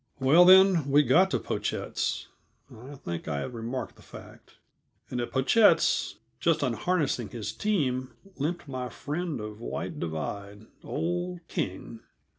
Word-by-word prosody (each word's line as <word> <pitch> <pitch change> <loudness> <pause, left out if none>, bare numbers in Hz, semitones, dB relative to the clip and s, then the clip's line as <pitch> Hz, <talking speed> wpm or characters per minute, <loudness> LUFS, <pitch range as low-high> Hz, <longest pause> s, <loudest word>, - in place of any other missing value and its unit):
Well, 150 +7 +6
then, 185 -5 +6
we 145 +2 +5
got 170 +9 +4
to - - +1
Pochette's - - -3 0.5
I 130 +6 -11
think 85 -11 -6
I 70 -2 -2
have 125 - -5
remarked 120 +2 -5
the - - -17
fact. - - -14 0.6
And 125 - -2
at 120 - -4
Pochette's, 140 - +3 0.2
just - - +2
unharnessing 150 - 0
his 110 -4 -5
team, 130 -12 -1 0.2
limped 155 +3 -3
my 130 -2 -4
friend 155 +1 -4
of 105 0 -7
White - - -5
Divide, 100 +6 -5 0.2
old 175 +1 -3
King. 95 +4 -4
130 Hz, 135 wpm, -28 LUFS, 115-175 Hz, 0.6 s, Well